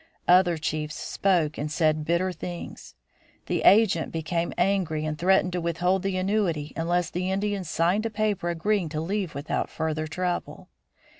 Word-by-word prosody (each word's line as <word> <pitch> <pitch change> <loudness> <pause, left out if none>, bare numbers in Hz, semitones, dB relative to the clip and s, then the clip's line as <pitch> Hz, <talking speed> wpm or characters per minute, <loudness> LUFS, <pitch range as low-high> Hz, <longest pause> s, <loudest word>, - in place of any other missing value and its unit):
Other 180 -1 +5
chiefs 155 -1 -3
spoke 175 -6 0
and 150 +1 -3
said 155 -1 +1
bitter 170 +3 +1
things. 175 -1 -8 0.5
The - - -1
agent 200 -6 +4
became 165 +1 -2
angry 175 -5 +1
and 155 0 -2
threatened 180 +2 +2
to 180 - -1
withhold 175 +3 +1
the 195 -1 -1
annuity 185 -6 0
unless 175 +1 0
the 180 +1 -2
Indians 195 -2 -2
signed 180 +8 +1
a - - -4
paper 210 -5 -1
agreeing 175 +1 0
to 155 0 -3
leave 185 0 -2
without 140 +2 -2
further 155 -1 -2
trouble. 180 +3 -3
175 Hz, 155 wpm, -26 LUFS, 160-190 Hz, 0.5 s, Other